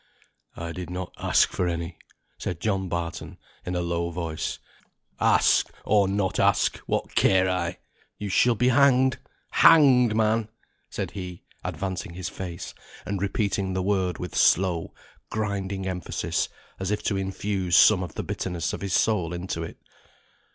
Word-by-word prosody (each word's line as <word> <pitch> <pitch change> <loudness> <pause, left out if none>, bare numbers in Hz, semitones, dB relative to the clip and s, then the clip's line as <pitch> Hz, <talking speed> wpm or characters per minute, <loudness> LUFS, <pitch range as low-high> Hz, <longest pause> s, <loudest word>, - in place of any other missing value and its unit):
"I 85 0 -5
did 90 +1 -6
not 90 0 -5
ask - - +3
for 90 - -1
any," 85 0 -4 0.4
said - - -4
John 95 -2 -1
Barton, 85 -1 -4 0.3
in 90 - -4
a 90 - 0
low 85 0 -1
voice. 85 -2 -3 0.6
"Ask, - - +4 0.2
or 100 -2 +4
not 95 -1 -1
ask, - - +3
what - - -2
care 95 -1 +4
I? 90 -1 -1 0.4
You 105 - -5
shall 120 +5 +3
be 125 +3 +2
hanged 130 -1 +4 0.3
hanged 130 -8 +6
man!" 110 0 +1 0.4
said - - -4
he, 90 -3 -7 0.2
advancing 95 -3 -4
his 90 -1 -4
face, 90 -2 -7 0.3
and 100 -2 -3
repeating 100 -1 -1
the 95 0 -1
word 95 -3 0
with 90 - -6
slow, 90 -2 +3 0.4
grinding 100 -2 -3
emphasis, 90 -3 -2 0.3
as 95 0 -2
if 105 0 -1
to 105 - 0
infuse 95 -1 -1
some 100 -4 +7
of 90 -3 -6
the - - -3
bitterness 85 -3 -3
of - - -5
his 100 -2 -3
soul 90 -7 +2
into 85 -1 -4
it. 80 - -7
95 Hz, 150 wpm, -26 LUFS, 90-105 Hz, 0.6 s, some